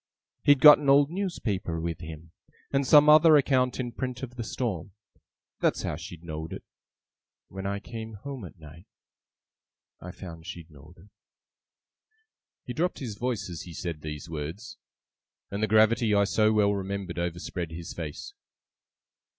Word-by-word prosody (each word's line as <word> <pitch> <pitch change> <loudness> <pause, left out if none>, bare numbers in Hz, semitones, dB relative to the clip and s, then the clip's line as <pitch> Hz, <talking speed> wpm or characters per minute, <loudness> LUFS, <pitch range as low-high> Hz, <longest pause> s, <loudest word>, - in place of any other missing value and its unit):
He'd 145 -2 +4
got 150 -1 +10
an 145 -2 -1
old 140 +2 +5
newspaper 110 - -2
with 85 0 -3
him, 80 0 -10 0.4
and 135 -1 +1
some 150 +1 +7
other 155 +1 +8
account 130 -3 +2
in 120 -2 -3
print 125 +2 -5
of 125 -1 -7
the 120 - -4
storm. 105 -6 -4 0.7
That's - - +1
how - - -2
she 85 - -9
know'd 80 -1 -7
it. - - -8 0.9
When 95 +1 -5
I 100 0 -2
came 110 0 -8
home 135 +2 -7
at 85 - -12
night, 80 +3 -14 1.1
I 90 - -9
found 85 -3 -10
she 85 -2 -7
know'd 75 +2 -17
it.' 95 +6 -18 1.5
He - - -6
dropped 180 +3 -1
his 120 -6 -5
voice 115 -2 -3
as 85 -3 -7
he 85 -2 -10
said 85 -4 -5
these 75 0 -6
words, 80 +8 -7 0.7
and 100 +1 -3
the 110 - +2
gravity 110 +1 +4
I 100 - +4
so 110 +2 +2
well 105 -1 +3
remembered 95 -2 -4
overspread 85 0 -4
his 85 +2 -7
face. 75 -4 -7
100 Hz, 160 wpm, -27 LUFS, 85-125 Hz, 1.5 s, got